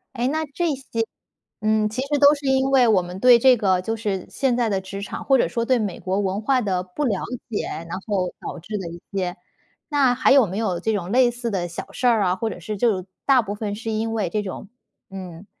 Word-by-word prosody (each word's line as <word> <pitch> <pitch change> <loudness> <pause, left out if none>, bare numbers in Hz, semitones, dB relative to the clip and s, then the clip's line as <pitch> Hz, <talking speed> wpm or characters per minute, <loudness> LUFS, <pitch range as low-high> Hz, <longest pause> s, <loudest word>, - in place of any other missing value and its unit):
哎， 245 +1 0
那 315 +3 -1
这 345 +1 0
些 230 -4 -3 0.6
嗯， 215 0 +2
其 245 +4 -3
实 290 +1 0
都 285 +1 +7
是 285 -1 -7
因 265 0 +2
为 255 -3 +5
我 195 -4 +4
们 180 +1 -7
对 245 -1 +7
这 255 +1 +6
个 190 -4 +2
就 225 +4 -2
是 200 -4 -3
现 260 -3 0
在 235 -2 +1
的 195 -2 0
职 195 +1 -7
场， - - -6
或 270 - +4
者 - - +3
说 235 -1 -1
对 255 0 +2
美 200 -5 -3
国 190 +1 -1
文 195 +1 -1
化 255 +3 +2
的 185 -5 -1
不 185 +11 -4
了 205 -7 0 0.3
解， 210 - -2 0.2
然 185 - -4
后 190 -4 -1
导 - - -6
致 210 +5 -5
的 175 -3 -5
一 170 +1 -9
些 185 -2 -2 0.5
那 275 -4 +3
还 255 - +4
有 270 -6 +6
没 185 +2 -5
有 185 -6 -1
这 220 +3 0
种 190 -3 -3
类 250 -1 +5
似 240 -1 -4
的 175 -3 -2
小 170 - -7
事 250 - -2
儿 225 -4 +4
啊， 180 0 +1
或 225 +3 -2
者 180 - -7
是 210 +5 -5
就 195 -4 +1 0.2
大 260 -3 +5
部 205 0 -4
分 205 -1 -4
是 225 +1 -5
因 220 +1 -1
为 200 -6 -1
这 210 - 0
种， 195 0 -7 0.4
嗯， 185 -1 -9
215 Hz, 265 characters per minute, -23 LUFS, 190-250 Hz, 0.6 s, 都